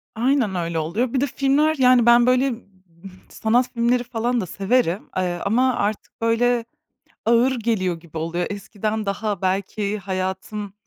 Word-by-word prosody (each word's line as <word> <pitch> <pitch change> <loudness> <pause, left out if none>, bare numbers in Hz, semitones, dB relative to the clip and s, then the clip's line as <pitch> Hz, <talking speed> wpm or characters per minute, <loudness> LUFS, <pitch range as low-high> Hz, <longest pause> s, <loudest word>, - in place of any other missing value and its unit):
Aynen 240 -3 +1
öyle 170 -2 -2
oluyor. 215 +11 -1
Bir 260 - +1
de - - +3
filmler 280 +4 +2
Yani 250 -2 +5
ben, 235 0 +6
böyle, 255 +1 +3 0.8
sanat 240 +3 +1
filmleri 240 +1 +1
falan 240 0 -1
da - - -3
severim, 195 +1 0
ııı, 180 -1 -1
ama 250 +5 +2
artık 205 +2 -3
böyle 230 +1 +2 0.6
ağır 235 +3 +3
geliyor 190 -7 -1
gibi 165 -1 -10
oluyor. 165 +2 -2
Eskiden 210 +1 -4
daha 205 +1 -2
belki 200 +2 -1
hayatım 190 +1 -4
220 Hz, 145 wpm, -22 LUFS, 190-245 Hz, 0.8 s, ben